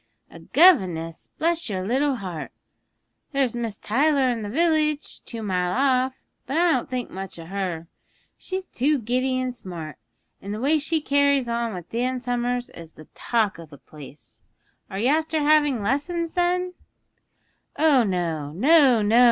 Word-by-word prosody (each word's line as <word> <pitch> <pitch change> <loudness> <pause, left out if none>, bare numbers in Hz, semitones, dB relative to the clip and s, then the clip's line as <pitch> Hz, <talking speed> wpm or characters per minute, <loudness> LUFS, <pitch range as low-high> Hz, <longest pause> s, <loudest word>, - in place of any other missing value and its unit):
'A - - -12
guviness, 180 - +3
bless 335 -3 0
your 185 -2 -3
little 270 +5 +1
heart. 180 -8 -6 0.8
There's 270 -4 +1
Miss 230 -3 -4
Tyler 275 +3 +2
in 235 -2 -3
the 205 - -5
village, 305 +1 0
two 230 -2 -7
mile 180 -3 -1
off 260 -1 +1 0.2
but 275 +5 -2
I 345 0 +4
don't 255 -1 0
think 250 -2 -4
much 190 -1 -7
of 165 0 -10
her. 185 -4 -3 0.5
She's 375 0 -5
too 295 -1 0
giddy 255 +2 -1
and 255 -1 -2
smart, 165 - -8 0.4
and 200 +1 -5
the - - -5
way 295 +6 +2
she 315 +2 -1
carries 280 -3 +2
on 235 -2 -2
with 175 -1 -9
Dan 250 +2 -1
Somers 245 0 -2
is 165 -1 -12
the 155 - -14
talk 220 -6 0
of 165 -2 -11
the 145 - -13
place! 145 0 -15 0.5
Are 190 - -6
you 235 +6 +1
after 315 +1 +1
having 295 -6 +3
lessons 325 - -1
then?' 360 0 0 1.0
'Oh 300 -4 +5
no, 170 -8 -2
no, 260 - +5
no!' 220 +3 +4
245 Hz, 160 wpm, -24 LUFS, 195-290 Hz, 1.0 s, Oh